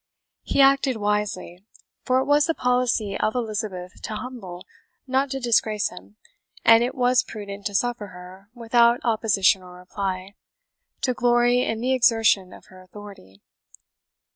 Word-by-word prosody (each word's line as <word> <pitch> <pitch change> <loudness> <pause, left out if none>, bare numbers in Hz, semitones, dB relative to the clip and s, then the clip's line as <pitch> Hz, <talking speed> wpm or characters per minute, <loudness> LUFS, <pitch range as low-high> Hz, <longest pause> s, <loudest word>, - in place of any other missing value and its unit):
He 280 - +1
acted 275 -2 +3
wisely; 205 -4 -3 0.4
for 255 0 +1
it 260 - +1
was 290 +1 +3
the 330 - 0
policy 245 -5 0
of 215 +2 -1
Elizabeth 210 -6 -5
to 215 - -5
humble, 195 -8 -8 0.4
not 265 +1 0
to 270 0 -4
disgrace 220 -4 +1
him, 180 +3 -14 0.5
and 230 0 +7
it 255 +2 -3
was 250 -1 +3
prudent 200 -1 -7
to 205 - -8
suffer 240 -2 -1
her, 185 +2 -13
without 235 +1 +3
opposition 215 -4 +2
or 180 -1 -13
reply, 185 +1 -5 0.7
to 255 - 0
glory 245 0 +2
in 225 -2 -2
the 255 +2 +1
exertion 225 -6 +3
of - - -14
her 185 0 -15
authority. 185 - -14
220 Hz, 145 wpm, -23 LUFS, 195-245 Hz, 0.7 s, and